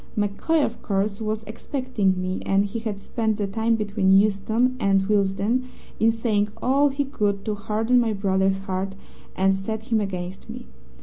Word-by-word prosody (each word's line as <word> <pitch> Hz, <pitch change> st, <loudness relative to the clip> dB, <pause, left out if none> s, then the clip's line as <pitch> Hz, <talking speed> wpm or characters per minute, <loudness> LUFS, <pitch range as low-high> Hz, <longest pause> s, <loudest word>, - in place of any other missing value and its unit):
MacCoy, 210 Hz, +10 st, +1 dB
of 235 Hz, -, -6 dB
course, 200 Hz, +1 st, -1 dB
was 215 Hz, 0 st, -2 dB
expecting 220 Hz, -3 st, -1 dB
me, 185 Hz, 0 st, -2 dB
and 195 Hz, +1 st, +2 dB
he 205 Hz, +3 st, -4 dB
had 215 Hz, -3 st, -4 dB
spent 220 Hz, 0 st, -1 dB
the 205 Hz, -, -1 dB
time 225 Hz, +3 st, +1 dB
between 200 Hz, -3 st, +3 dB
Euston 220 Hz, +5 st, +2 dB
and 195 Hz, -3 st, +3 dB
Willesden 205 Hz, +4 st, +1 dB, 0.3 s
in 225 Hz, +1 st, +4 dB
saying 220 Hz, -2 st, 0 dB
all 275 Hz, +3 st, +3 dB
he 280 Hz, +1 st, -1 dB
could 205 Hz, -7 st, -1 dB
to 215 Hz, -, -1 dB
harden 220 Hz, +4 st, +1 dB
my 230 Hz, -2 st, +1 dB
brother's 195 Hz, -1 st, +1 dB
heart 190 Hz, 0 st, -3 dB, 0.4 s
and 195 Hz, +1 st, +3 dB
set 220 Hz, +4 st, -4 dB
him 220 Hz, -1 st, +3 dB
against 185 Hz, -2 st, -5 dB
me. -, -, -8 dB
210 Hz, 170 wpm, -24 LUFS, 195-225 Hz, 0.4 s, in